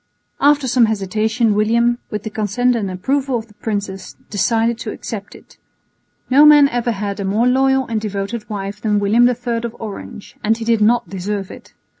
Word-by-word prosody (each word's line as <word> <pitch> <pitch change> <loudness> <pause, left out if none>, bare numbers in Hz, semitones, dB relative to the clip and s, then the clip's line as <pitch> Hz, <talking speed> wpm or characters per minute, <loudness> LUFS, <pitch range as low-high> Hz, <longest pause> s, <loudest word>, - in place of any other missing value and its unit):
After 285 -1 +3
some 245 -1 +4
hesitation 220 +2 0
William, 235 +3 +2
with 210 -2 -4
the 220 - -5
consent 220 +4 0
and 205 -4 -2
approval 260 +8 -1
of 220 - -6
the 210 - -20
princess, 200 -3 -5 0.2
decided 225 +3 +1
to 225 - -5
accept 205 -2 -7
it. - - -18 0.7
No 275 +3 +5
man 295 -1 +8
ever 240 -1 -1
had 200 -1 -4
a - - -2
more 205 +5 +1
loyal 265 +1 +2
and 225 -2 -2
devoted 210 +2 -4
wife 205 0 -5
than 210 -2 +1
William 225 +5 +4
III 245 -1 -2
of 230 0 -5
Orange, 215 0 -9
and 220 +1 +2
he 230 - -6
did 230 -1 +2
not 235 +2 +3
deserve 195 +1 -4
it. - - -14
225 Hz, 185 wpm, -18 LUFS, 205-240 Hz, 0.7 s, man